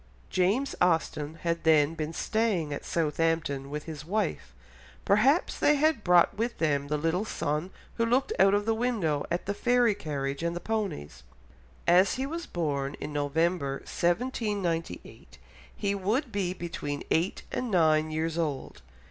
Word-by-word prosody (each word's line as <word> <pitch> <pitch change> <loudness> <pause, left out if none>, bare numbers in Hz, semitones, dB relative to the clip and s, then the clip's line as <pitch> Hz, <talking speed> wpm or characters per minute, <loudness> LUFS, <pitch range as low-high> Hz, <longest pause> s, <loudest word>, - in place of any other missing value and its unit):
James 200 +10 +1
Austen 160 -3 +1
had 170 0 -1
then 155 -1 +4
been 155 -1 -4
staying 190 -5 0
at 140 - -5
Southampton 160 -3 0
with 150 +1 -4
his 155 -3 -7
wife; 170 - -2 0.5
perhaps 260 - +3
they 295 - +4
had 305 -5 +2
brought 175 -1 +5
with 235 +3 -2
them 145 -3 0
the 150 +1 0
little 165 +6 0
son 155 -5 -2 0.3
who 230 - +2
looked 265 - +1
out 195 +1 +6
of 205 0 0
the 225 - +2
window 220 -11 0
at 170 +1 -2
the 200 - -1
fairy 240 +1 +3
carriage 140 -6 -4
and 170 0 -1
the - - -3
ponies; 200 - -3 0.6
as 180 +3 +5
he 260 +1 -2
was 335 +4 -5
born 140 -5 -2
in 150 - -7
November 145 +1 0
1798 180 - -2 0.4
he 200 -1 -1
would 220 +7 -1
be 195 -4 -1
between 150 -5 -5
eight 170 +4 +1
and 250 - -2
nine 155 -4 +3
years 160 +1 -2
old. 150 -5 -3
170 Hz, 155 wpm, -28 LUFS, 150-215 Hz, 0.6 s, out